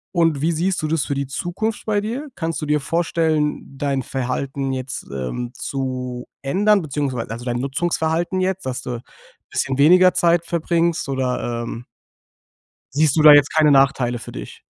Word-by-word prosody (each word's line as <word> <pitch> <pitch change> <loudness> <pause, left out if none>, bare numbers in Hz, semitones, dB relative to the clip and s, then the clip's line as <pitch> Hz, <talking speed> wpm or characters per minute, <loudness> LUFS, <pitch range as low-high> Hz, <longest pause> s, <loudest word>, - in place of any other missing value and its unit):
Und 165 -4 +2
wie 165 +4 +1
siehst 180 +4 0
du 155 - -1
das 155 -2 +1
für - - -2
die 140 -1 -2
Zukunft 185 +10 -3
bei 210 -2 +1
dir? 240 +8 -4
Kannst 165 -2 -3
du - - -2
dir 150 0 +2
vorstellen 160 -2 -1
dein 140 -1 0
Verhalten 135 +2 -3
jetzt, 130 0 -5
ähm, 70 - -4
zu 125 -2 -4 0.2
ändern? 200 +8 +3
Beziehungsweise, 140 -6 -3
also, 115 +1 -6
dein 120 -1 -2
Nutzungsverhalten 160 +5 -1
jetzt, 190 0 -1
dass 130 -1 -3
du 125 - -5
'n 120 -1 -5 0.5
bisschen 135 -1 -1
weniger 180 +6 +6
Zeit 170 0 +2
verbringst, 170 -1 0
oder, 125 -3 -2
ähm 115 +1 -7 1.1
siehst 155 -1 +3
du - - +5
da 150 -1 +10
jetzt 145 -1 +5
keine 155 -1 +5
Nachteile 135 -3 +3
für - - -9
dich? - - -9
145 Hz, 170 wpm, -21 LUFS, 130-170 Hz, 1.1 s, da